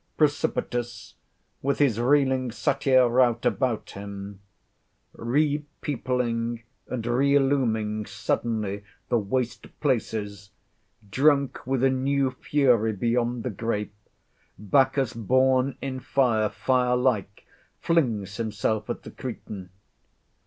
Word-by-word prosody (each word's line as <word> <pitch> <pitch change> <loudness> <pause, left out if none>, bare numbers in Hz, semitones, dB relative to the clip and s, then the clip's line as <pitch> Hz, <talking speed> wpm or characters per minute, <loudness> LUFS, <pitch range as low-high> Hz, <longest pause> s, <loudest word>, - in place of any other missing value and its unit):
Precipitous, 130 -5 -1 0.5
with 140 +1 0
his 130 -7 +2
reeling 130 0 +2
Satyr 130 +1 +3
rout 120 -1 +2
about 125 -5 0
him, 100 0 -8 0.7
re 145 +5 0 0.2
peopling 120 -4 -1 0.2
and 120 -3 -4
re 130 +4 +2
illuming 110 -7 +1
suddenly 105 -1 -2 0.3
the 120 - +3
waste 120 +4 -2
places, 105 -7 -2 0.6
drunk 140 +4 +2
with 130 -1 0
a 135 - +5
new 135 0 +1
fury 125 -5 +2
beyond 120 +3 0
the 125 - -2
grape, 105 -1 -3 0.6
Bacchus, 130 +3 +2
born 130 +4 +2
in 130 -1 -3
fire, 120 -5 +1
fire 125 +3 +1
like 120 -6 0 0.3
flings 115 - 0
himself 110 -1 -2
at - - -4
the - - -9
Cretan. 95 -3 -7
120 Hz, 105 wpm, -26 LUFS, 110-135 Hz, 0.7 s, a